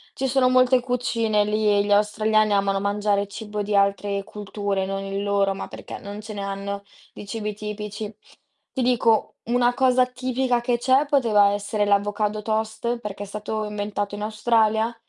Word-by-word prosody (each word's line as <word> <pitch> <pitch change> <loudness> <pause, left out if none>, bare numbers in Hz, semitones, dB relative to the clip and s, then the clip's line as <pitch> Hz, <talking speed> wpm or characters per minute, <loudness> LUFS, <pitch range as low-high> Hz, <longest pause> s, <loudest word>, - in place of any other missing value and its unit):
ci 265 - -1
sono 260 -1 +3
molte 255 0 +5
cucine 230 -4 0
lì 215 +1 0
e 205 -1 +4
gli 205 - -2
australiani 215 +1 +3
amano 195 0 +2
mangiare 205 0 0
cibo 210 +1 -5
di 205 0 -1
altre 200 0 +1
culture, 200 -1 -3
non 195 0 -3
il 195 0 -3
loro, 200 -1 +1
ma 195 - -6
perché - - -9
non 205 +1 -8
ce 215 0 -8
ne 200 - -5
hanno 200 0 -4 0.3
di - - -9
cibi 210 0 -3
tipici. 210 0 -6 0.6
Ti 260 - -2
dico, 235 -3 +2
una 245 +1 +2
cosa 255 -1 +3
tipica 255 0 -1
che 240 0 +1
c'è 260 +4 +3
poteva 225 -8 +4
essere 205 +1 -1
l'avocado 205 +1 +1
toast 220 +2 -2
perché 205 -3 -6
è - - -10
stato 215 +1 -4
inventato 205 -1 -3
in 205 - -6
Australia, 220 +1 +1
210 Hz, 170 wpm, -24 LUFS, 205-235 Hz, 0.6 s, molte